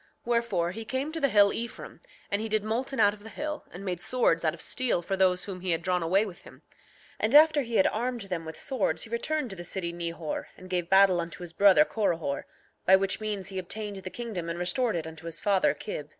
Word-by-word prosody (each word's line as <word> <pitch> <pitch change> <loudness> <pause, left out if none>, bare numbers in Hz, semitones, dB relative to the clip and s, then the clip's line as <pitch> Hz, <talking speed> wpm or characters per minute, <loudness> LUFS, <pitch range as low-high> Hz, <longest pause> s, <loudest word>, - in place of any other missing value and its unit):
7:9 - - -41
Wherefore, 235 -8 +1
he 225 +4 -6
came 265 +6 -3
to 325 0 -4
the 275 - +3
hill 205 -3 +5
Ephraim, 235 +1 -6 0.3
and 200 +1 +1
he 225 - -3
did 215 -1 +1
molten 240 +5 -2
out 205 -1 +5
of 210 - -14
the 220 - -10
hill, 300 +5 -5
and 185 +3 -9
made 180 -2 -2
swords 195 -8 +1
out 160 0 +1
of - - -18
steel 235 0 0
for 195 - -1
those 185 -1 +2
whom 185 -3 -7
he 185 - -3
had 165 -1 0
drawn 180 0 +1
away 190 +6 +2
with 185 -5 -9
him; - - -16 0.6
and 220 +6 +1
after 305 -1 +7
he 235 -3 -4
had 190 - +5
armed 240 +2 -1
them 180 -4 -4
with 160 0 -8
swords 260 -7 -1
he 225 - -10
returned 275 +2 -1
to - - -6
the 175 - -7
city 175 -1 -4
Nehor 170 -2 -4
and 185 0 -12
gave 175 -2 -1
battle 190 -2 +5
unto 170 +1 -7
his 170 -1 -8
brother 190 -5 +6
Corihor, 165 -10 -1 0.4
by 190 - +7
which 195 +2 +1
means 205 -3 -3
he 190 -1 -4
obtained 205 +2 -5
the 190 -1 -6
kingdom 210 -7 -5
and 170 - -3
restored 220 +6 0
it 165 -2 -2
unto 160 +1 -9
his 165 -1 -3
father 200 -2 +2
Kib. 150 -8 -6
195 Hz, 245 wpm, -28 LUFS, 175-225 Hz, 0.6 s, after